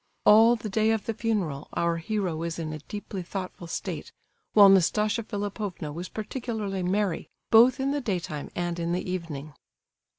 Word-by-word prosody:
All 225 Hz, +3 st, +7 dB
the 225 Hz, -, -6 dB
day 215 Hz, +2 st, +2 dB
of 220 Hz, -2 st, 0 dB
the 225 Hz, -, -1 dB
funeral 205 Hz, -11 st, -2 dB
our 170 Hz, 0 st, +1 dB
hero 190 Hz, -1 st, -2 dB
was 165 Hz, +1 st, -3 dB
in 160 Hz, -2 st, -4 dB
a 155 Hz, -, -6 dB
deeply 200 Hz, +4 st, -6 dB
thoughtful 180 Hz, -1 st, -6 dB
state, -, -, -5 dB, 0.4 s
while 205 Hz, -2 st, +9 dB
Nastasia 210 Hz, +4 st, +3 dB
Philipovna 205 Hz, -6 st, -4 dB
was 175 Hz, +4 st, -6 dB
particularly 215 Hz, -3 st, -4 dB
merry, 190 Hz, 0 st, -1 dB, 0.2 s
both 240 Hz, +3 st, +7 dB
in 270 Hz, +1 st, 0 dB
the 290 Hz, 0 st, -1 dB
daytime 175 Hz, -, -3 dB
and 175 Hz, -1 st, -2 dB
in 170 Hz, 0 st, -1 dB
the 180 Hz, -, -2 dB
evening. 155 Hz, -5 st, -5 dB
195 Hz, 165 wpm, -27 LUFS, 170-215 Hz, 0.4 s, while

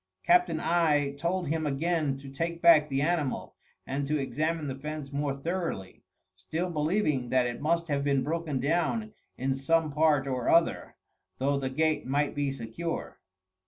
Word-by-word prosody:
Captain 355 Hz, 0 st, +4 dB
I 155 Hz, -4 st, +2 dB
told 170 Hz, +5 st, -2 dB
him 160 Hz, 0 st, 0 dB
again 150 Hz, 0 st, 0 dB
to 135 Hz, 0 st, -11 dB
take 165 Hz, +4 st, -3 dB
back 165 Hz, -3 st, +6 dB
the 135 Hz, 0 st, 0 dB
animal, 155 Hz, -4 st, -1 dB, 0.3 s
and 140 Hz, +1 st, -2 dB
to 150 Hz, +1 st, +1 dB
examine 155 Hz, +3 st, -1 dB
the 135 Hz, -, -3 dB
fence 145 Hz, +1 st, -6 dB
more 140 Hz, -1 st, -1 dB
thoroughly, 165 Hz, -, -4 dB, 0.3 s
still 160 Hz, -, -3 dB
believing 150 Hz, -5 st, 0 dB
that 130 Hz, 0 st, +3 dB
it 120 Hz, +1 st, -4 dB
must 170 Hz, +2 st, +1 dB
have 140 Hz, -2 st, 0 dB
been 140 Hz, -2 st, +2 dB
broken 155 Hz, -2 st, -2 dB
down 175 Hz, -, 0 dB, 0.2 s
in 135 Hz, +1 st, 0 dB
some 155 Hz, +4 st, +1 dB
part 150 Hz, -2 st, +3 dB
or 130 Hz, -3 st, -1 dB
other, 165 Hz, 0 st, +2 dB, 0.4 s
though 140 Hz, +2 st, +1 dB
the 135 Hz, -1 st, -2 dB
gate 155 Hz, +1 st, 0 dB
might 145 Hz, +2 st, +1 dB
be 145 Hz, -1 st, -1 dB
secure. 135 Hz, +7 st, -5 dB
150 Hz, 160 wpm, -29 LUFS, 135-165 Hz, 0.4 s, back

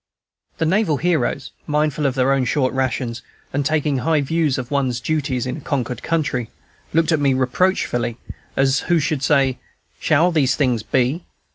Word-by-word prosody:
The 160 Hz, -, 0 dB
naval 165 Hz, -3 st, +2 dB
heroes, 160 Hz, -4 st, 0 dB, 0.2 s
mindful 150 Hz, -1 st, +1 dB
of 135 Hz, -, -2 dB
their 135 Hz, +1 st, +3 dB
own 135 Hz, -1 st, +1 dB
short 130 Hz, -1 st, +1 dB
rations, 125 Hz, -2 st, -2 dB, 0.3 s
and 145 Hz, +1 st, 0 dB
taking 150 Hz, -1 st, +1 dB
high 155 Hz, +2 st, +2 dB
views 155 Hz, -1 st, 0 dB
of 130 Hz, 0 st, -5 dB
one's 130 Hz, -4 st, 0 dB
duties 140 Hz, -3 st, -1 dB
in 125 Hz, +2 st, -3 dB
a -, -, -9 dB
conquered 125 Hz, -4 st, -2 dB
country, 145 Hz, -8 st, -1 dB, 0.4 s
looked 165 Hz, +1 st, +2 dB
at 160 Hz, -, +3 dB
me 140 Hz, -2 st, +2 dB
reproachfully, 130 Hz, -4 st, 0 dB, 0.4 s
as 135 Hz, 0 st, +3 dB
who 175 Hz, -, +4 dB
should 150 Hz, -2 st, 0 dB
say, 135 Hz, -3 st, +2 dB, 0.4 s
"Shall 160 Hz, +4 st, +3 dB
these 145 Hz, -6 st, +2 dB
things 125 Hz, -6 st, +1 dB
be?" 130 Hz, -, 0 dB
140 Hz, 165 wpm, -21 LUFS, 130-155 Hz, 0.4 s, who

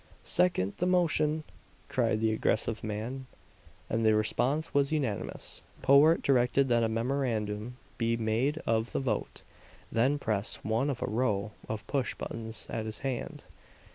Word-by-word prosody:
"Second 175 Hz, -, +2 dB
the 180 Hz, -, 0 dB
motion!" 155 Hz, -4 st, +2 dB, 0.4 s
cried 115 Hz, -3 st, +1 dB
the 110 Hz, 0 st, +3 dB
aggressive 110 Hz, 0 st, 0 dB
man; 115 Hz, +5 st, -4 dB, 0.6 s
and 115 Hz, 0 st, 0 dB
the 110 Hz, -1 st, +5 dB
response 130 Hz, +8 st, 0 dB
was 140 Hz, 0 st, +2 dB
unanimous. 135 Hz, -10 st, -3 dB, 0.2 s
Powart 140 Hz, +5 st, +6 dB
directed 130 Hz, 0 st, +3 dB
that 120 Hz, -1 st, +4 dB
a 115 Hz, -, +2 dB
memorandum 115 Hz, -2 st, -1 dB, 0.2 s
be 115 Hz, 0 st, +1 dB
made 115 Hz, +7 st, 0 dB
of 110 Hz, 0 st, 0 dB
the -, -, +1 dB
vote; 120 Hz, -6 st, -3 dB, 0.5 s
then 130 Hz, +6 st, +2 dB
pressed 110 Hz, -6 st, -2 dB
one 115 Hz, +6 st, +1 dB
of 135 Hz, -, -2 dB
a -, -, -1 dB
row 105 Hz, -3 st, 0 dB, 0.2 s
of 105 Hz, -1 st, -4 dB
pushbuttons 115 Hz, -4 st, -3 dB
at 110 Hz, -1 st, -3 dB
his 110 Hz, -, -4 dB
hand. 130 Hz, -3 st, -3 dB
115 Hz, 140 wpm, -30 LUFS, 110-140 Hz, 0.6 s, Powart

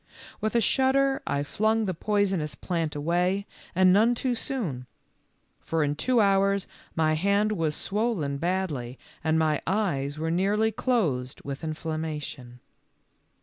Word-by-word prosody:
With 215 Hz, +2 st, -2 dB
a 235 Hz, -, +4 dB
shudder 270 Hz, +3 st, +2 dB
I 145 Hz, 0 st, 0 dB
flung 220 Hz, +8 st, +1 dB
the 185 Hz, -, -1 dB
poisonous 190 Hz, -5 st, 0 dB
plant 165 Hz, -3 st, -2 dB
away, 175 Hz, +6 st, 0 dB, 0.3 s
and 185 Hz, 0 st, +6 dB
none 225 Hz, +5 st, +4 dB
too 250 Hz, +1 st, 0 dB
soon, 200 Hz, -, -3 dB, 0.7 s
for 165 Hz, -1 st, -1 dB
in 145 Hz, 0 st, +1 dB
two 250 Hz, +9 st, +2 dB
hours 200 Hz, -1 st, +3 dB, 0.3 s
my 155 Hz, -1 st, +2 dB
hand 200 Hz, +6 st, +2 dB
was 165 Hz, -7 st, 0 dB
swollen 195 Hz, -10 st, -1 dB
bad]y 160 Hz, -8 st, -2 dB, 0.3 s
and 160 Hz, 0 st, +2 dB
my 155 Hz, -2 st, +2 dB
eyes 155 Hz, -8 st, 0 dB
were 160 Hz, +1 st, -1 dB
nearly 205 Hz, +5 st, +2 dB
closed 170 Hz, -, -1 dB
with 140 Hz, -1 st, -5 dB
inflam 155 Hz, 0 st, -3 dB
mation. 145 Hz, -6 st, -6 dB
180 Hz, 140 wpm, -27 LUFS, 150-210 Hz, 0.7 s, and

